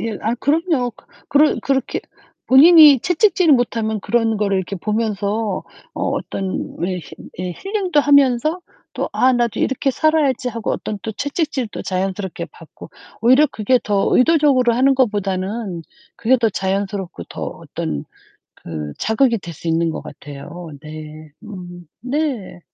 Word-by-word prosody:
예. 225 -1 -3
아 225 +2 0
그럼요. 295 -3 +1
그 - - -21 0.2
그런 295 +2 +3
그렇게 270 -2 -1 0.5
본인이 295 0 +8
채찍질을 360 - +3
못 245 -2 0
하면 220 -1 -1
그런 225 +1 +1
거를 200 -2 0
이렇게 190 +1 -4
보면서 210 0 -2 0.3
어 - - -4
어떤 190 -1 -4
왜 180 +2 -2
힐 165 - -12 0.3
예 180 -1 -3
힐링도 380 - 0
하면서 285 +3 +3 0.3
또 - - -2
'아 260 +1 +3
나도 240 -2 0
이렇게 265 +1 0
살아야지.' 290 -4 +1
하고 230 -2 -4
어떤 210 - -4
또 220 - -4
채찍질도 285 - -3
자연스럽게 190 0 -3
받고 - - -14 0.3
오히려 260 +6 +5
그게 240 +4 +1
더 200 -2 +1
의도적으로 270 -4 +4
하는 270 +3 +4
것보다는 200 -5 -1 0.3
그게 245 +3 +3
더 230 -1 +2
자연스럽고 195 - -3
더 - - -8
어떤 70 -2 -5 0.5
그 75 -3 -7
자극이 230 +2 +2
될 175 -3 -9
수 165 - -7
있는 165 0 +1
것 - - -5
같아요. 155 +4 -10
네. 155 0 -10
음 175 -4 -10
네. 255 - -3
225 Hz, 300 characters per minute, -19 LUFS, 190-275 Hz, 0.5 s, 본인이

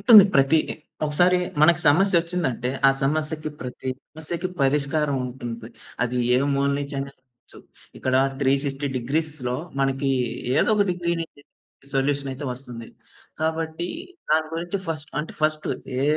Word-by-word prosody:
ఉంటుంది. 215 -5 +10
ప్రతిది 140 +3 +3 0.3
ఒకసారి 175 +5 +4 0.2
మనకు 170 +1 +6
సమస్య 175 +3 +5
ఒచ్చిందంటే, 160 -8 -2 0.2
ఆ - - +7
సమస్యకి 155 +2 -1
ప్రతి 125 +1 -6 0.2
సమస్యకి 165 +3 -4
పరిష్కారం 140 +1 +1
ఉంటుంది. 120 -2 -6 0.3
అది 125 0 -1 0.2
ఏ - - +4 0.2
మూల 140 0 +2
నుంచి 140 0 -5
అయినా 140 0 -4
కావచ్చు. 125 -2 -19 0.4
ఇక్కడ 130 - 0 0.3
360 140 +1 +1
డిగ్రీస్‌లో 135 -1 -2 0.2
మనకి 135 0 +1 0.5
ఏదో - - +3
ఒక 205 - +4
డిగ్రీ 170 -1 -1
నుంచి 145 -3 -12 0.5
సొల్యూషన్ 140 0 +1
అయితే 135 +3 -7
వస్తుంది. 120 -3 -9 0.5
కాబట్టి 160 +2 -1 0.4
దాని 155 0 +3
గురించి 175 +4 -2
ఫస్ట్ 155 -1 -4
అంటే 155 - -4
ఫస్ట్ 155 0 +1 0.3
ఏ - - +1
145 Hz, 135 wpm, -24 LUFS, 135-160 Hz, 0.5 s, ఉంటుంది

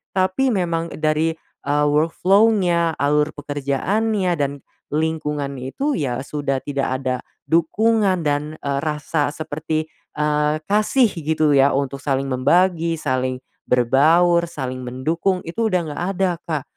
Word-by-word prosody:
tapi 190 +8 +2
memang 170 -4 -1
dari 155 +1 +1 0.2
eee 145 +1 +1
workflow-nya, 175 +1 +3
alur 150 +1 +1
pekerjaannya, 175 - -1
dan 140 -1 +1 0.4
lingkungan 150 -3 -1
itu 135 - -2
ya 130 -5 -2
sudah 140 -2 -2
tidak 140 -1 -2 0.2
ada 130 -1 0 0.3
dukungan 190 +3 +2
dan, 150 +1 -1
eee, 140 -1 -1
rasa 150 0 -1
seperti, 155 +1 -3 0.3
eee, 150 0 +1
kasih 215 +3 +3
gitu 155 -2 0
ya 140 0 +4
untuk 140 0 -2
saling 135 -1 -1
membagi, 170 +5 +2
saling 130 -4 -1 0.3
berbaur, 165 +8 +4
saling 130 -6 -5
mendukung, 165 +9 -1
itu 225 +7 -1
udah 180 -4 +1
nggak 145 - -4
ada 190 -1 +2 0.2
Kak. 155 -4 -2
155 Hz, 125 wpm, -21 LUFS, 140-175 Hz, 0.4 s, ya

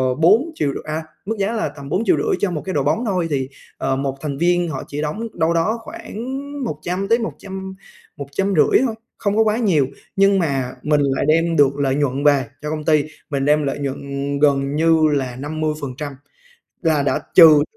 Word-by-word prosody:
bốn 220 - +4
triệu 140 -2 0
rư - - -5
à, 155 +1 -3 0.2
mức 220 +3 -2
giá 200 +3 +1
là 225 -2 -1
tầm 140 -2 -10
4.500.000 350 - +1
cho 195 -3 0
một 155 - -3
cái 190 - -3
đội - - +1
bóng 235 +2 0
thôi, 180 -5 0
thì, 135 -1 -1 0.3
ờ, 135 0 0
một 135 0 -2
thành 140 -3 -3
viên 175 +1 +2
họ 135 -4 -4
chỉ 145 +1 -4
đóng 210 +10 -3
đâu 165 0 +1
đó 190 +8 +1
khoảng 225 0 -8 0.4
100 180 +1 -3
tới 230 +3 +3
một 225 - -3
trăm 190 -1 -7 0.4
một 140 -1 -6
trăm 195 +6 0
rưỡi 155 - +4
thôi, 225 -4 -2 0.2
không 205 0 -1
có 225 - +6
quá 215 0 +1
nhiều, 170 - +2 0.3
nhưng 195 0 +4
mà 135 -6 -1
mình 150 -1 +2
lại 135 0 0
đem 165 +1 +3
được 140 -2 +4
lợi 135 -1 +1
nhuận 140 -1 0
về 145 -3 +4 0.2
cho 150 - -4
công 155 -1 -4
ty, 155 -2 +4 0.3
mình 140 -2 -1
đem 150 +1 +3
lợi 140 0 -2
nhuận 140 -1 -3 0.4
gần 140 -1 +2
như 160 +1 +3
là 130 -3 -1
50%, 150 -1 -4 0.7
là 155 -3 +2
đã 140 - +1 0.2
trừ 155 -4 +9
155 Hz, 205 wpm, -20 LUFS, 140-190 Hz, 0.7 s, trừ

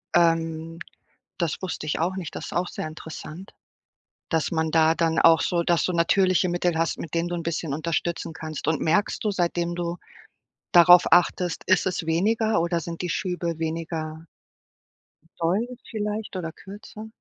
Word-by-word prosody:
ähm, 165 -1 +1 0.6
das 170 -3 -1
wusste 180 -4 -4
ich 150 - -1
auch 180 +4 -1
nicht. 180 -5 -6
Das - - -5
ist - - -9
auch 175 +1 0
sehr - - -5
interessant, 160 +3 -9 0.8
dass 160 -2 0
man 160 -1 0
da 160 0 +4
dann 165 -1 +1
auch 165 -1 +6
so 175 -1 +1
dass 170 -1 +2
du 185 - 0
natürliche 185 +2 +3
Mittel 175 -1 0
hast, 165 - 0
mit 165 - -7
denen 170 +1 0
du 175 - -3
'n 170 - -4
bisschen 165 -3 -2
unterstützen 165 +2 -2
kannst. 155 -2 -6
Und 160 -2 +1
merkst 185 +6 +1
du, 210 - +2
seitdem 175 -2 -1
du 175 0 -3 0.7
darauf 175 0 +7
achtest 175 0 +2
ist 185 - +3
es 180 -2 -2
weniger 215 +7 +1
oder 170 0 0
sind 165 +1 -6
die 180 - -3
Schübe 170 -1 -2
weniger 160 0 -4 1.1
doll 185 +8 +1 0.2
vielleicht 210 -1 -4
oder 165 -3 -4
kürzer? 205 +4 -11
170 Hz, 165 wpm, -25 LUFS, 160-180 Hz, 1.1 s, darauf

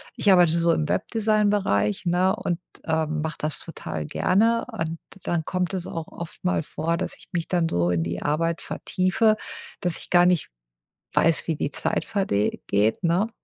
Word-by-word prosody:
ich 200 - +3
arbeite 175 -2 +5
so 170 0 +3
im 155 -1 0
Webdesign-Bereich, 205 - +1
ne, 180 +2 +3
und, 175 -1 -2 0.3
ähm, 160 -1 0
mache 160 0 -4
das 155 0 -1
total 80 - -6
gerne. 225 - +2
Und 165 -6 -3 0.3
dann 170 -2 0
kommt 180 0 -1
es 185 -2 -3
auch 165 -1 -5
oft 170 -1 -9
mal 90 -2 +1
vor, 165 +2 -2
dass - - -3
ich - - -18
mich 170 -1 -1
dann 175 -2 +2
so 85 0 +1
in 85 -2 +1
die 85 +1 -3
Arbeit 165 +3 0
vertiefe, 190 +4 +1 0.5
dass 175 -2 +2
ich - - -9
gar 175 -1 +6
nicht 180 -2 +2 0.6
weiß, 165 0 +3
wie 160 - +1
die 145 - -2
Zeit - - -1
verde 190 - 0 0.2
geht, 105 - +1
ne? 175 +6 +2
170 Hz, 180 wpm, -25 LUFS, 155-185 Hz, 0.6 s, gar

